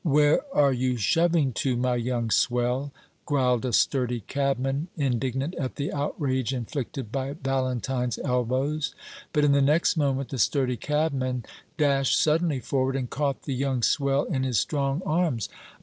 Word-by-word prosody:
"Where 150 Hz, -, +4 dB
are 140 Hz, -, +4 dB
you 125 Hz, 0 st, 0 dB
shoving 160 Hz, -, +2 dB
to, 130 Hz, -3 st, 0 dB
my 125 Hz, 0 st, +1 dB
young 120 Hz, -1 st, -1 dB
swell?" 125 Hz, +5 st, +1 dB, 0.4 s
growled 130 Hz, -4 st, +1 dB
a 125 Hz, -, -1 dB
sturdy 125 Hz, 0 st, +1 dB
cabman, 135 Hz, -, -1 dB
indignant 135 Hz, +2 st, -1 dB
at 130 Hz, -, -3 dB
the 145 Hz, -, -3 dB
outrage 135 Hz, -3 st, -1 dB
inflicted 125 Hz, -1 st, -5 dB
by 135 Hz, +1 st, -2 dB
Valentine's 130 Hz, -, -1 dB
elbows; 135 Hz, +3 st, -1 dB, 0.4 s
but 150 Hz, -2 st, +2 dB
in 145 Hz, -, +4 dB
the 140 Hz, 0 st, +4 dB
next 150 Hz, +7 st, +3 dB
moment 135 Hz, -3 st, 0 dB
the 135 Hz, -, -4 dB
sturdy 130 Hz, +1 st, +2 dB
cabman 130 Hz, -3 st, -1 dB, 0.3 s
dashed 140 Hz, -3 st, +3 dB
suddenly 155 Hz, -2 st, +2 dB
forward 130 Hz, +2 st, -1 dB
and 130 Hz, -3 st, -3 dB
caught 140 Hz, -1 st, -1 dB
the 140 Hz, -, -3 dB
young 130 Hz, -2 st, -1 dB
swell 140 Hz, +3 st, +2 dB
in 135 Hz, -6 st, -2 dB
his 130 Hz, -3 st, 0 dB
strong 140 Hz, -, 0 dB
arms. 155 Hz, -, 0 dB
135 Hz, 150 wpm, -26 LUFS, 125-145 Hz, 0.4 s, Where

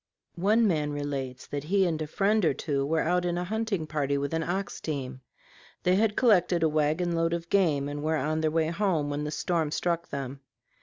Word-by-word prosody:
One 220 Hz, +4 st, +4 dB
man 150 Hz, -5 st, 0 dB
relates 135 Hz, -3 st, -4 dB
that 145 Hz, 0 st, -5 dB
he 190 Hz, +3 st, +3 dB
and 160 Hz, -3 st, -1 dB
a 155 Hz, -, -2 dB
friend 205 Hz, +6 st, +1 dB
or 155 Hz, -5 st, +3 dB
two 140 Hz, -1 st, -1 dB
were 160 Hz, +1 st, +1 dB
out 180 Hz, +2 st, +1 dB
in 175 Hz, -1 st, -1 dB
a 175 Hz, -, -1 dB
hunting 210 Hz, -3 st, -2 dB
party 145 Hz, -2 st, -1 dB
with 140 Hz, +2 st, -2 dB
an 160 Hz, -, 0 dB
ox 190 Hz, +4 st, -3 dB
team. 135 Hz, -4 st, -4 dB, 0.6 s
They 180 Hz, -, +3 dB
had 210 Hz, +1 st, +2 dB
collected 180 Hz, -7 st, +3 dB
a 160 Hz, -, +4 dB
wagon 155 Hz, +3 st, +1 dB
load 165 Hz, 0 st, +1 dB
of 170 Hz, 0 st, -4 dB
game 155 Hz, -8 st, +2 dB
and 145 Hz, 0 st, -4 dB
were 160 Hz, +1 st, 0 dB
on 155 Hz, +3 st, -1 dB
their 155 Hz, -, +2 dB
way 160 Hz, 0 st, +1 dB
home 170 Hz, -5 st, 0 dB
when 145 Hz, +1 st, -2 dB
the -, -, -2 dB
storm 160 Hz, 0 st, -1 dB
struck 170 Hz, +2 st, -1 dB
them. 135 Hz, -1 st, -5 dB
160 Hz, 215 wpm, -28 LUFS, 145-180 Hz, 0.6 s, One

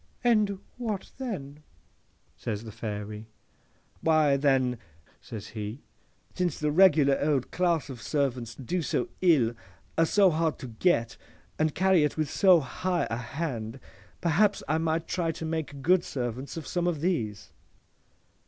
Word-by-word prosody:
—'And 215 Hz, -5 st, +3 dB, 0.2 s
what 220 Hz, -6 st, -4 dB
then?' 155 Hz, -, -5 dB, 0.7 s
says 110 Hz, -2 st, -4 dB
the 110 Hz, -, -8 dB
Fairy.—'Why, 110 Hz, +8 st, -2 dB
then,' 135 Hz, -3 st, +2 dB, 0.4 s
says 110 Hz, -2 st, -8 dB
he, 110 Hz, +4 st, -6 dB, 0.5 s
'since 180 Hz, -4 st, -1 dB
the 150 Hz, -1 st, +1 dB
regular 150 Hz, -5 st, +5 dB
old 145 Hz, -4 st, +1 dB
class 170 Hz, -3 st, +1 dB
of 130 Hz, -4 st, -8 dB
servants 125 Hz, -5 st, -1 dB
do 170 Hz, +7 st, -2 dB
so -, -, -1 dB
ill, 145 Hz, -11 st, +4 dB, 0.5 s
are 165 Hz, -, +5 dB
so 195 Hz, -1 st, +5 dB
hard 160 Hz, 0 st, 0 dB
to 130 Hz, -, -8 dB
get, 115 Hz, -1 st, +1 dB, 0.4 s
and 155 Hz, -1 st, +1 dB
carry 190 Hz, -4 st, +4 dB
it 150 Hz, -, 0 dB
with 155 Hz, -2 st, -1 dB
so 185 Hz, -4 st, +6 dB
high 180 Hz, +6 st, -1 dB
a 115 Hz, -, -1 dB
hand, 120 Hz, -2 st, -4 dB, 0.4 s
perhaps 190 Hz, +5 st, +2 dB
I 155 Hz, -, +1 dB
might 165 Hz, 0 st, -1 dB
try 170 Hz, -3 st, 0 dB
to 160 Hz, -, -6 dB
make 160 Hz, -4 st, -4 dB
good 180 Hz, +3 st, +4 dB
servants 125 Hz, +3 st, -4 dB
of 160 Hz, -, -5 dB
some 175 Hz, -1 st, -1 dB
of 160 Hz, -5 st, -1 dB
these. 115 Hz, -, -2 dB
150 Hz, 145 wpm, -28 LUFS, 125-175 Hz, 0.7 s, so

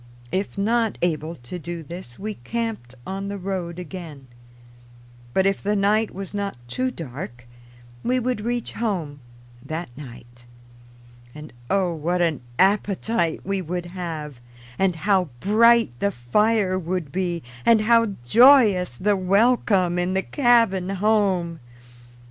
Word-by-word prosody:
If 195 Hz, +2 st, -2 dB
not 225 Hz, +2 st, +1 dB
able 160 Hz, -1 st, -1 dB
to 165 Hz, +7 st, -8 dB
do 170 Hz, 0 st, -6 dB
this, 160 Hz, -6 st, -9 dB
we 215 Hz, +2 st, -4 dB
camped 210 Hz, -, -4 dB
on 195 Hz, +1 st, -4 dB
the 200 Hz, 0 st, -4 dB
road 180 Hz, -3 st, -4 dB
again. 170 Hz, -6 st, -8 dB, 1.1 s
But 190 Hz, +9 st, +2 dB
if 195 Hz, 0 st, +1 dB
the 205 Hz, +1 st, 0 dB
night 210 Hz, +2 st, +2 dB
was 195 Hz, +1 st, -7 dB
not 200 Hz, -7 st, -3 dB
too 255 Hz, -, -1 dB
dark 125 Hz, -, -8 dB, 0.6 s
we 255 Hz, +1 st, +1 dB
would 250 Hz, -2 st, -1 dB
reach 240 Hz, +1 st, -2 dB
home 175 Hz, -11 st, -3 dB, 0.4 s
that 160 Hz, -6 st, -6 dB
night. 120 Hz, -3 st, -12 dB, 0.9 s
And 150 Hz, -2 st, -10 dB, 0.2 s
oh, 190 Hz, -3 st, +1 dB
what 170 Hz, +3 st, -1 dB
an 165 Hz, -6 st, +1 dB, 0.2 s
appetite 195 Hz, -2 st, +1 dB
we 195 Hz, 0 st, -1 dB
would 175 Hz, +1 st, -4 dB
have, 165 Hz, -6 st, -6 dB, 0.4 s
and 190 Hz, -2 st, +2 dB
how 190 Hz, +2 st, +2 dB
bright 230 Hz, -, +4 dB
the 200 Hz, -, +2 dB
fire 195 Hz, -, +1 dB
would 175 Hz, -4 st, -3 dB
be, 175 Hz, -3 st, -2 dB, 0.2 s
and 225 Hz, -, +5 dB
how 230 Hz, -2 st, +3 dB
joyous 210 Hz, -, +6 dB
the 205 Hz, +1 st, +2 dB
welcome 195 Hz, -2 st, +2 dB
in 180 Hz, +1 st, -1 dB
the 190 Hz, -, +1 dB
cabin 230 Hz, -9 st, +3 dB
home! 195 Hz, -4 st, +1 dB
190 Hz, 135 wpm, -23 LUFS, 165-210 Hz, 1.1 s, joyous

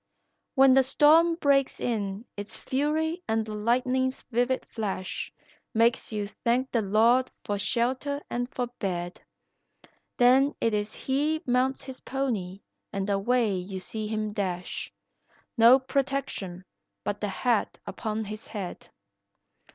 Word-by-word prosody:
When 270 Hz, -1 st, +7 dB
the 270 Hz, -, +7 dB
storm 315 Hz, +5 st, +5 dB
breaks 280 Hz, -4 st, +2 dB
in 210 Hz, -2 st, -2 dB
its 205 Hz, 0 st, -6 dB
fury 315 Hz, +5 st, -1 dB
and 220 Hz, 0 st, +1 dB
the 215 Hz, -, -6 dB
lightning's 255 Hz, +4 st, 0 dB
vivid 245 Hz, +2 st, +1 dB
flash 200 Hz, -4 st, -4 dB, 0.4 s
Makes 230 Hz, +1 st, +2 dB
you 210 Hz, -2 st, -2 dB
thank 245 Hz, +5 st, -1 dB
the 230 Hz, -, +2 dB
Lord 225 Hz, +5 st, +3 dB, 0.2 s
for 205 Hz, -1 st, -1 dB
shelter 260 Hz, +7 st, 0 dB
and 245 Hz, +1 st, -2 dB
for 250 Hz, -, -1 dB
bed, 175 Hz, -2 st, -3 dB, 1.0 s
Then 260 Hz, +3 st, +5 dB
it 230 Hz, -, +1 dB
is 210 Hz, +1 st, -2 dB
he 295 Hz, +4 st, 0 dB
mounts 255 Hz, +2 st, +1 dB
his 265 Hz, -1 st, -7 dB
pony 210 Hz, -9 st, -3 dB, 0.3 s
and 195 Hz, 0 st, -2 dB
away 220 Hz, +2 st, +2 dB
you 185 Hz, +1 st, -4 dB
see 215 Hz, +3 st, -5 dB
him 215 Hz, -1 st, -2 dB
dash, 185 Hz, -4 st, -3 dB, 0.6 s
No 235 Hz, +2 st, +8 dB
protection 260 Hz, -9 st, -2 dB, 0.4 s
but 205 Hz, -, -3 dB
the 210 Hz, -, 0 dB
hat 230 Hz, +2 st, 0 dB
upon 220 Hz, 0 st, -3 dB
his 215 Hz, +2 st, -7 dB
head. 195 Hz, -5 st, -6 dB
235 Hz, 130 wpm, -27 LUFS, 205-265 Hz, 1.0 s, No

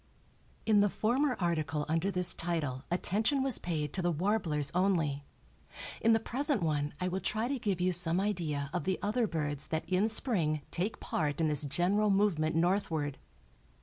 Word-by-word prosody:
In 215 Hz, -2 st, +4 dB
the 205 Hz, 0 st, +4 dB
former 250 Hz, +7 st, +1 dB
article 155 Hz, -4 st, -1 dB
under 165 Hz, +4 st, 0 dB
this 180 Hz, -2 st, +2 dB
title 150 Hz, -6 st, -3 dB
attention 215 Hz, +10 st, 0 dB
was 270 Hz, -4 st, +1 dB
paid 150 Hz, -4 st, -3 dB
to 190 Hz, -, -2 dB
the 175 Hz, -, +1 dB
warblers 165 Hz, -5 st, 0 dB
only. 165 Hz, -7 st, 0 dB, 0.8 s
In 230 Hz, -, +4 dB
the 225 Hz, -, +4 dB
present 260 Hz, -, 0 dB
one 150 Hz, -2 st, -1 dB
I 180 Hz, -, -1 dB
will 185 Hz, +1 st, -2 dB
try 215 Hz, +5 st, -1 dB
to 270 Hz, 0 st, -2 dB
give 200 Hz, -5 st, -1 dB
you 180 Hz, +1 st, +1 dB
some 175 Hz, 0 st, +4 dB
idea 160 Hz, -8 st, -2 dB
of 180 Hz, -, -2 dB
the 190 Hz, -1 st, 0 dB
other 220 Hz, +3 st, +1 dB
birds 145 Hz, -5 st, -3 dB
that 160 Hz, 0 st, -3 dB
in 190 Hz, +4 st, +1 dB
spring 170 Hz, -, +1 dB
take 190 Hz, +6 st, -2 dB
part 145 Hz, -3 st, -2 dB
in 160 Hz, -1 st, +2 dB
this 150 Hz, -1 st, +3 dB
general 180 Hz, +9 st, +1 dB
movement 195 Hz, -6 st, +1 dB
northward. 165 Hz, -5 st, 0 dB
175 Hz, 175 wpm, -31 LUFS, 155-205 Hz, 0.8 s, In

